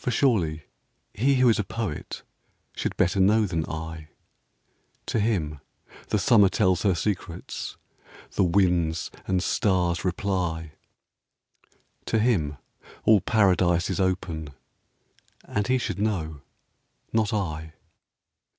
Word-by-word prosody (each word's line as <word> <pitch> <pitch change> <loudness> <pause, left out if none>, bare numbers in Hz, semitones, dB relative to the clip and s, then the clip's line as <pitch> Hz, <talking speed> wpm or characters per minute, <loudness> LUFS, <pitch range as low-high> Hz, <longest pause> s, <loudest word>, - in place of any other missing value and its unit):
For - - 0
surely 90 - +1 0.5
he 135 +6 +2
who 130 -1 +4
is 115 - +4
a - - +1
poet 105 -6 -5 0.5
Should - - -3
better 90 +3 +2
know 105 +3 +4
than 85 -5 -1
I. 80 0 -6 1.0
To - - -1
him 85 -9 0 0.5
the - - +1
summer 105 -2 +5
tells 95 -2 +2
her 95 -4 +2
secrets, 90 -2 -4 0.3
— - - -21
The - - +3
winds 85 -3 +1 0.2
and 95 -1 +1
stars 90 -5 +1
reply; 90 -4 -2 1.3
To 115 - +1
him 95 - +1 0.5
all 105 -3 +5
Paradise 90 -5 +2
is - - -2
open, 85 -6 -2 0.9
And 105 0 -2
he 130 0 +3
should 120 - -3
know 80 -9 -2 0.3
— - - -43
not 110 -2 +2
I. 80 -6 -3
95 Hz, 125 wpm, -26 LUFS, 80-105 Hz, 1.3 s, summer